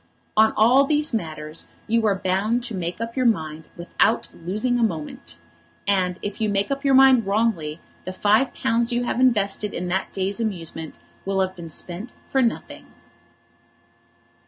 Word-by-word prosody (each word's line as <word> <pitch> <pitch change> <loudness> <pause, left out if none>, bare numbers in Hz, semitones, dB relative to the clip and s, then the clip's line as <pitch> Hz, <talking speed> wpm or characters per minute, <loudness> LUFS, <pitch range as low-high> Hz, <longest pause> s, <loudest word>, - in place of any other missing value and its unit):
On 220 0 +5
all 245 +6 +5
these 300 0 +1
matters 155 -6 -4 0.2
you 225 0 +2
are 200 - +3
bound 195 +6 0
to 235 -2 -3
make 175 0 -4
up 230 0 -5
your 255 -2 +2
mind 160 -7 -1
without 185 +6 +1
losing 215 +9 -1
a - - +2
moment; 150 - -4 0.5
and 185 -3 +1
if 205 +1 -5
you 215 - +1
make 200 +4 0
up 275 0 -2
your 275 -1 +4
mind 260 -5 +6
wrongly 195 -7 0 0.3
the 185 - -4
five 210 +7 +2
pounds 230 +1 0
you 240 0 0
have 240 - -2
invested 210 -5 +1
in 180 - -3
that 190 +2 -1
day's 195 +2 -2
amusement 165 -7 -4 0.3
will 195 0 -1
have 190 0 -1
been 170 -2 -9
spent 180 +8 -7 0.2
for 265 - +2
nothing. 235 -2 -2
205 Hz, 165 wpm, -23 LUFS, 180-235 Hz, 0.5 s, mind